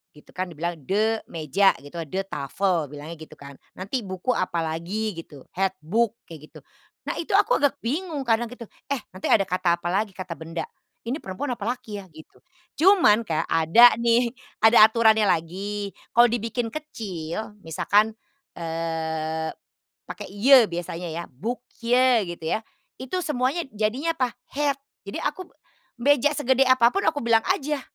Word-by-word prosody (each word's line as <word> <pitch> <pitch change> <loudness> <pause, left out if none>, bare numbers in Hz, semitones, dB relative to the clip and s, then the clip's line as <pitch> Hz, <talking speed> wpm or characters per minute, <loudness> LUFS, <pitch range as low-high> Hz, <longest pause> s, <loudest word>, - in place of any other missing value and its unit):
gitu 150 - -18
kan, 185 0 -3
dibilang 170 0 -4
de 215 +9 0
meja 165 +5 +2
gitu, 145 +4 -8
"de 190 +5 -2
tafel", 165 0 -1
bilangnya 150 +3 -9
gitu 155 -1 -12
kan. 140 -1 -13 0.2
Nanti 200 +8 -3
buku 185 +6 -2
apalagi, 175 +2 -2
gitu. 145 -4 -12
"het 190 +1 -1
boek", 220 +7 +1
kayak 155 -3 -12
gitu. - - -14 0.4
Nah, - - -4
itu 340 +3 -1
aku 415 +5 +4
agak 285 -1 +2
bingung 295 +3 -2
kadang 235 -1 +1
gitu, 245 0 -10 0.2
eh 280 -2 -1
nanti 185 0 -5
ada 200 - +5
kata 180 -2 +1
apalagi, 185 +4 -2
kata 185 -3 -7
benda, 165 0 -5 0.4
ini 255 +7 -3
perempuan 195 +9 -5
apa 200 - -6
laki 215 -5 -8
ya? 195 - -11
Gitu. 155 -2 -16 0.4
Cuman, 305 - +5
kayak 160 -2 -1
ada 170 +10 +6
nih, 235 0 +3 0.3
ada 220 -1 +8
aturannya 220 -2 +4
lagi, 195 +5 -2 0.2
kalau 240 +1 +7
dibikin 235 +1 -2
kecil, 210 - -6
misalkan, 205 +7 +2 0.4
eee, 160 -1 -3 0.6
pakai - - -7
"je", 250 +4 +7
biasanya 175 -1 -5
ya. 170 +1 -4
"Boekje", 240 - +1
gitu 175 -2 -7
ya. 220 - -12 0.3
Itu 260 +8 -3
semuanya 290 +2 0
jadinya 250 +10 -1
apa? 255 -4 0 0.2
Het. 285 0 0 0.2
Jadi 200 - -7
aku 345 +5 -4
p - - -29 0.5
meja 290 +1 +4
segede 260 -2 +2
apa 245 -2 +6
pun 395 - +1
aku 290 -6 0
bilang 225 -1 +4
aja 300 -6 0
210 Hz, 155 wpm, -24 LUFS, 170-245 Hz, 0.6 s, ada